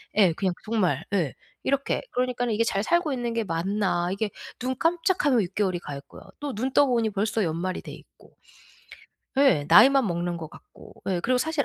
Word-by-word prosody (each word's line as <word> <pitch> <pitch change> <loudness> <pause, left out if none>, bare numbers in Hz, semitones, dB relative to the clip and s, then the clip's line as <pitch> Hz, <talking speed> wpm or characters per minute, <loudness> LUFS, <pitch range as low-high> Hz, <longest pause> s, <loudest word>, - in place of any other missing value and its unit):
예 195 -5 +5
그냥 185 +1 -1
정말 185 - 0
예. 170 -9 +1 0.3
이렇게. 275 0 0
그러니까는 245 -2 -1
이게 225 - +2
'잘 200 -3 0
살고 340 +2 +1
있는 240 -3 -2
게 230 -1 0
맞나.' 180 0 -1
이게 205 +1 -2 0.3
눈 255 +1 -2
깜짝하면 330 - +2
6 185 0 -5
개월이 185 -4 0
가 145 -4 -7
있고요. 140 0 -13 0.2
또 290 -2 -4
눈 255 +6 -2
떠보니 245 -6 +3
벌써 210 +1 -1
연말이 170 +3 -2
돼 - - -9
있고. - - -16 1.0
예 265 - +4
나이만 270 0 +7
먹는 175 0 -2
것 160 -2 -7
같고. - - -16
예 180 -2 0
그리고 250 +6 +1
사실 315 +1 0
215 Hz, 340 characters per minute, -26 LUFS, 180-260 Hz, 1.0 s, 나이만